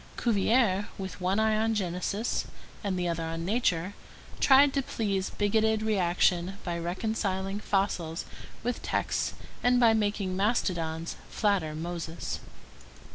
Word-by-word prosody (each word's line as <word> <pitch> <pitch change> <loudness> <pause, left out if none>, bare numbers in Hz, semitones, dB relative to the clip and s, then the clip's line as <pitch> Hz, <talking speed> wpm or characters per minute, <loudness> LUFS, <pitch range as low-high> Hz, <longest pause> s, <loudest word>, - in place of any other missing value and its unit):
Cuvier, 215 -2 +2
with 190 0 -6
one 185 +3 +1
eye 220 0 +3
on 225 +1 +1
Genesis 195 +3 -1 0.4
and 195 -3 -1
the 180 -1 0
other 170 -1 -1
on 165 +1 -3
nature, 190 -4 +1 0.5
tried 275 +1 +6
to 275 - +2
please 200 -6 -1
bigoted 220 +1 +1
reaction 185 -2 +2
by 175 -2 -2
reconciling 195 +2 -2
fossils 190 -5 -1 0.4
with 245 +1 -2
texts - - -1 0.3
and 245 0 +4
by 230 -2 +6
making 205 -3 0
mastodons 170 -6 0
flatter 190 -8 +1
Moses. 165 0 -4
195 Hz, 125 wpm, -29 LUFS, 175-220 Hz, 0.5 s, tried